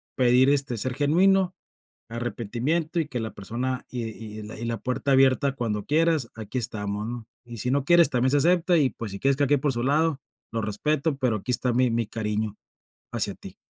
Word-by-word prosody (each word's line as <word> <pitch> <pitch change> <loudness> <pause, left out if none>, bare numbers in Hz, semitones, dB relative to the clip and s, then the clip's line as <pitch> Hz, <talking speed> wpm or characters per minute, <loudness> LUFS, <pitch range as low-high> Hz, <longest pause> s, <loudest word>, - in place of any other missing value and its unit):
pedir, 125 +1 +4
este, 135 -4 +1
ser 125 +4 -1
genuino, 180 +7 +3 0.6
arrepentimiento 120 - -2
y 155 - -1
que 125 -5 -4
la 110 - -5
persona 125 +5 -4
y 125 - -4
y 110 -1 -7
y 110 +2 -5
la 115 0 -2
puerta 125 +5 -2
abierta 135 +1 +4
cuando 105 -5 -2
quieras, 155 -4 +2
aquí 110 +2 -6
estamos, 105 -2 -2
¿no?, 120 -1 -6 0.2
y 120 -1 -9
si 125 +3 -1
no 140 0 +1
quieres 170 -2 +6
también 130 0 +1
se 145 - +4
acepta 175 +3 +3
y, 140 -4 +3
pues, 110 -2 -7
si 100 - -6
quieres 135 0 +2
que - - -14
cada 145 - +3
quien 145 -1 +2
por 145 -2 +1
su 120 - -2
lado, 150 +1 +1 0.3
lo 115 -1 -2
respeto, 140 +9 0
pero 125 -5 +1
aquí 125 - -4
está 125 0 +1
mi 125 0 +3
mi 115 0 0
cariño, 105 -1 -2 0.6
hacia - - 0
ti. - - -11
125 Hz, 205 wpm, -25 LUFS, 115-145 Hz, 0.6 s, quieres